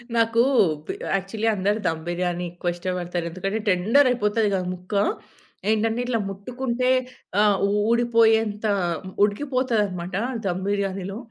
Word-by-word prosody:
నాకు 230 0 +3 0.4
P - - -4 0.2
actually 195 +3 -2
అందరూ 205 +2 0
ధమ్ 160 -1 -1
బిర్యానీ 175 0 -1
ఎక్కువ 175 0 -2
ఇష్టపడతారు. 175 -1 -3
ఎందుకంటే 195 +5 -3
టెండర్ 210 +9 +4
అయిపోతది 215 -2 +1
గదా 185 -1 0
ముక్క. 180 +3 -10 0.8
ఏంటంటే, 220 +1 +1
ఇట్లా 245 -2 0
ముట్టుకుంటే 245 +5 -2 0.5
ఆహ్, 205 -2 +4 0.3
ఊడిపోయేంత 225 -2 +3 0.6
ఉడికిపోతదనమాట 210 -6 0 0.3
ధమ్ 185 0 -1
బిర్యానీలో. 195 -1 -2
205 Hz, 110 wpm, -24 LUFS, 185-230 Hz, 0.8 s, టెండర్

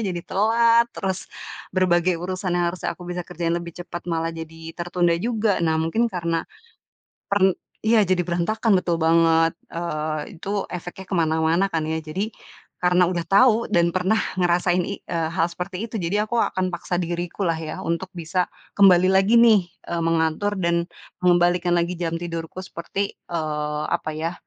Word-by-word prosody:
jadi 175 - -4
telat, 230 +3 +4
terus 190 -1 -3 0.5
berbagai 180 -1 +3
urusan 185 0 -2
yang 175 - +2
harusnya 185 - -4
aku 180 - -12
bisa 180 0 -3
kerjain 165 0 -2
lebih 170 -1 -5
cepat, 175 0 -7
malah 165 0 -1
jadi 160 0 -9 0.2
tertunda 175 0 +1
juga. 220 -3 0
Nah 160 0 +2
mungkin 225 +9 +1
karena, 170 -2 -1 0.9
per 200 - +2 0.5
iya, 220 -2 +5
jadi 180 -1 +2
berantakan, 205 +6 0
betul 175 -2 0
banget. 165 0 +4 0.2
Eee, 155 +1 -4
itu 195 - -6 0.2
efeknya 180 +2 -7
ke - - -1
mana-mana 160 +3 +2
kan 160 -1 0
ya. 160 0 -1
Jadi, 185 +8 -3 0.5
karena 180 0 +4
udah 170 -2 -2
tahu, 230 +2 +4
dan 170 -1 +3
pernah 185 +4 +2 0.2
ngerasain 175 0 +2
i 200 - -5
eee, 165 -2 -2
hal 165 - +3
seperti 180 +4 -5
itu, 225 - -6
jadi 200 +5 0
aku 235 - -1
akan 185 -3 0
paksa 175 +1 -3
diriku 175 +2 -3
lah - - +3
ya, 160 -1 -5
untuk 170 +3 -2
bisa 175 +2 -1 0.3
kembali 185 -2 +6
lagi 195 +4 +4
nih, 215 -7 +5 0.2
eee, 170 0 -1
mengatur 165 +5 +1
dan 170 -1 0 0.3
mengembalikan 175 0 +3
lagi, 170 +1 0
jam 165 -1 -2
tidurku, 165 +1 -5
seperti, 195 +3 -4 0.2
eee, 150 -2 -2
apa 170 -2 -1
ya, 165 +2 -2
175 Hz, 165 wpm, -23 LUFS, 165-190 Hz, 0.9 s, kembali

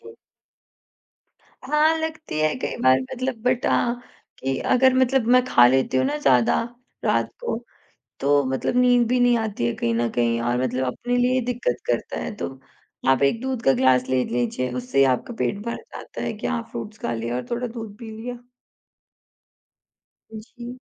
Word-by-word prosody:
जी। 450 - -13 1.5
हाँ, 300 +4 +3
लगती 315 - -4
है 155 0 +2
कई - - -3
बार 130 0 +5
मतलब 255 - -3
बट 250 0 +1
अ, 235 - +2 0.4
कि 135 0 -2 0.2
अगर 260 +1 +5
मतलब 260 -2 +2
मैं 255 - +5
खा 120 - +6
लेती 130 +1 +2
हूँ 130 - +3
ना 145 +2 -1
ज़्यादा 125 -5 +3 0.5
रात - - +1
को, 475 - -2 0.6
तो 145 0 +3
मतलब 130 - -1
नींद 245 -1 +4
भी 250 0 +2
नहीं 245 -1 +4
आती 210 - -2
है 120 - 0
कहीं 115 0 -1
न 115 0 +1
कहीं 115 -1 +1
और 120 +1 0
मतलब 130 +1 -1
अपने 245 - -2
लिए 250 +1 +2
दिक्कत 245 - -1
करता - - -2
है 220 - -5
तो, 135 -7 -6 0.5
आप 135 +1 +4
एक 180 +12 +2
दूध 260 -3 -3
का 135 - +5
ग्लास 130 0 +3
ले 130 -1 +1
लीजिए, 125 +1 -2
उससे 125 +2 -3
ही 135 - +7
आपका 230 - -4
पेट 205 - -1
भर 235 - -3
जाता - - -9
है - - -2
कि 215 - -5
हाँ, 235 -2 -1
फ्रूट्स 215 0 -7
खा - - -3
लिया 115 +1 -3
और 125 - -4
थोड़ा 240 +1 -1
दूध 225 -3 -8
पी 230 -2 -8
लिया। 240 +3 -7 1.9
जी। 240 +3 -9
220 Hz, 180 wpm, -23 LUFS, -, 1.9 s, ही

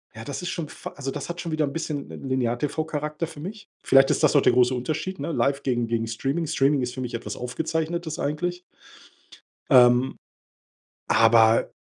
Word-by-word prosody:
ja, 110 - -8
das 140 +7 -5
ist 180 - -4
schon 160 -4 -4
fa - - -8
also 135 -1 -4
das 145 +3 -6
hat 170 +1 -5
schon 165 - -5
wieder 155 -1 +1
'n 140 - -5
bisschen 150 -3 -4
'n - - -9
Linear-TV-Charakter 150 +5 -2
für 160 -3 -12
mich. 200 +6 -8
Vielleicht 135 0 +5
ist - - 0
das - - +4
auch 140 - +6
der - - +4
große 125 +1 +4
Unterschied, 155 +9 -3
ne? 150 +4 -3
Live 140 -1 0
gegen 120 -3 0
gegen 115 -1 -1
Streaming. 135 +8 -2
Streaming 140 -2 +2
ist 125 0 -3
für 130 - -5
mich 125 -2 -5
etwas 115 - -5
Aufgezeichnetes 160 +5 -3
eigentlich. 175 +5 -2 1.1
Ähm, 125 0 +5 0.9
aber 115 0 +5
140 Hz, 185 wpm, -25 LUFS, 125-160 Hz, 1.1 s, auch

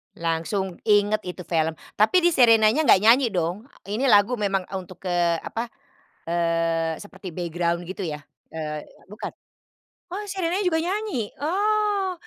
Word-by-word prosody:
Langsung 170 +3 -2
inget 205 0 +4
itu 180 0 -6
film, 160 -2 0 0.2
tapi 340 - +4
di 345 - +5
Sherinanya 235 +1 +5
enggak 195 -1 +6
nyanyi, 240 +3 +6
dong. 180 +7 -2 0.2
Ini 215 +8 -1
lagu 210 +1 +4
memang 195 -2 0 0.2
untuk, 185 +1 -13
eee, 175 -2 +1
apa, 230 +2 -4 0.6
eee, 165 -1 0
seperti 185 -4 -10
background 170 0 -1
gitu 185 +1 -5
ya. 150 -2 -6 0.2
Eee, 155 -1 -5 0.3
bukan. 210 - -6 0.8
Oh, 395 - -3
Sherinanya 370 0 -1
juga 325 -2 +2
nyanyi? 370 - -2
Oh, 405 +3 +1
205 Hz, 135 wpm, -24 LUFS, 170-270 Hz, 0.8 s, enggak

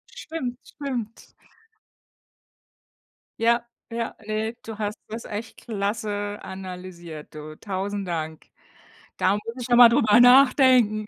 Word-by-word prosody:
Stimmt, 255 -7 -5
stimmt. 245 -6 -6 2.1
Ja, 235 +1 +3 0.3
ja, 230 0 -3
ne, 215 +2 -2
du 220 -1 -8
hast 210 +1 -2
das 225 +2 -6
echt 215 +2 -6
klasse 205 -1 -3
analysiert, 180 -5 -9
du, 155 0 -8
tausend 200 -1 -3
Dank. 160 -2 -4 0.7
Da 185 - +3
muss 205 - -2 0.2
ich 245 - -4
noch 240 - +4
mal 240 -1 +10
drüber 225 -1 +4
nachdenken. 250 -4 +6
215 Hz, 115 wpm, -24 LUFS, 195-235 Hz, 2.1 s, mal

